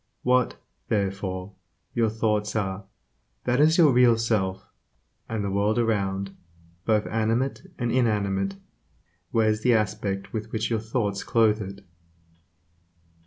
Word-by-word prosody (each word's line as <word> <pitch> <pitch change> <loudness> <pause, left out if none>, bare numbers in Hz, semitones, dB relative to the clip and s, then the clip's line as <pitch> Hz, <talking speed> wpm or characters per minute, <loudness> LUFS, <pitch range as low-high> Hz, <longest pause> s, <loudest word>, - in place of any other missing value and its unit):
What, 125 0 +2 0.3
therefore, 95 -2 -2 0.4
your 115 -2 +2
thoughts 105 -1 -1
are, 95 -2 -2 0.6
that 125 +1 +1
is 155 +2 +5
your 160 -5 +6
real 120 -2 +5
self; 105 -5 -1 0.6
and 110 -2 -2
the 100 - -2
world 100 +3 +1
around, 100 -4 0 0.5
both 110 -2 +2
animate 115 +4 -1
and 120 -1 -1
inanimate, 100 -5 +1 0.8
wears 110 -1 +2
the 125 0 +4
aspect 105 -2 -2
with 110 0 -4
which 110 +1 -2
your 115 - +1
thoughts 110 -3 -2
clothe 110 -2 +3
it. 100 0 -8
110 Hz, 120 wpm, -26 LUFS, 100-115 Hz, 0.8 s, your